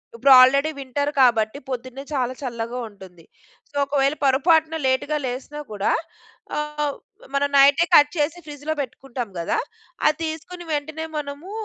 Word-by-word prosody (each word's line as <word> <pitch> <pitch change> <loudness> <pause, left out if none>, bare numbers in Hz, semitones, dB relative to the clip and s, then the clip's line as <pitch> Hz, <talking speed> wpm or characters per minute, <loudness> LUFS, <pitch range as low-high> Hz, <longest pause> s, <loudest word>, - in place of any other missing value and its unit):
ఇప్పుడు 280 -12 +3
already 275 +4 +5
winter 285 +2 -2
కాబట్టి 225 -1 +3
పొద్దున్నే 255 +1 -5
చాలా 255 -2 0
చల్లగా 240 -1 -4
ఉంటుంది. 190 -4 -15 0.5
సో 290 - -23
ఒకవేళ 275 +1 +1
పొరపాటున 320 +4 +3
లేట్‌గా 260 +4 0
లేసినా 260 +4 -5
కూడా 205 -1 0 0.7
ఆహ్, 300 -1 -2 0.4
మనం 285 0 +1
నైటే 280 +4 +6
కట్ 290 0 +7
చేసి 300 +3 0
ఫ్రిడ్జ్‌లో 295 +1 -4
పెట్టుకుంటాం 255 -2 -6
గదా! 170 - -1 0.5
అది 305 0 +2
తీసుకొని 325 +3 -7
వెంటనే 310 +2 -3
మనము 290 +4 -6
280 Hz, 135 wpm, -22 LUFS, 255-300 Hz, 0.7 s, కట్